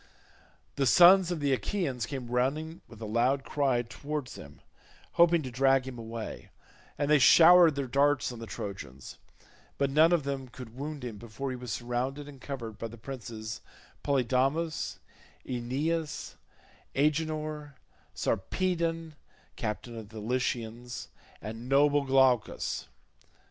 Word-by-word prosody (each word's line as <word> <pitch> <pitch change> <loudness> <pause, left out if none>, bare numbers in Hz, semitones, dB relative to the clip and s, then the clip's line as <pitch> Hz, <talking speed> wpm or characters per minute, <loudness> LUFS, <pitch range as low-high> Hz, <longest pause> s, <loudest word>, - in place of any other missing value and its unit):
The 135 -1 +2
sons 180 +5 +7
of 175 -3 -2
the 140 -2 +1
Achaeans 130 - -2
came 130 -4 -6
running 150 +7 -1
with 115 - -14
a - - -3
loud 125 +5 +1
cry 135 -5 +1
towards 145 +3 -5
him, - - -12 0.5
hoping 170 -1 +4
to 130 - -6
drag 135 +1 +3
him 125 -2 -7
away, 115 -1 -7 0.5
and 145 - 0
they 150 - +6
showered 170 +3 +8
their 140 -1 -2
darts 140 +2 +2
on 120 - -8
the 115 - -7
Trojans, 70 -13 -7 0.6
but 140 -1 +1
none 155 +4 +5
of 170 -4 +3
them 135 -1 -3
could 120 -2 -11
wound 145 +1 -6
him 115 -4 -6
before 120 +5 -5
he - - -3
was 125 -2 -7
surrounded 125 +7 -3
and 140 -2 -12
covered 120 -6 -6
by 115 - -3
the 115 +1 -12
princes 115 -3 -7 0.4
Polydamas, 135 +4 0 0.5
Aeneas, 145 +6 -2 0.6
Agenor, 150 0 -1 0.4
Sarpedon 165 - -1 0.4
captain 115 +2 -4
of 110 -2 -8
the 110 0 -9
Lycians, 120 0 -3 0.3
and 115 +3 -7
noble 145 +1 +4
Glaucus. 130 -4 +2
135 Hz, 135 wpm, -29 LUFS, 120-150 Hz, 0.6 s, showered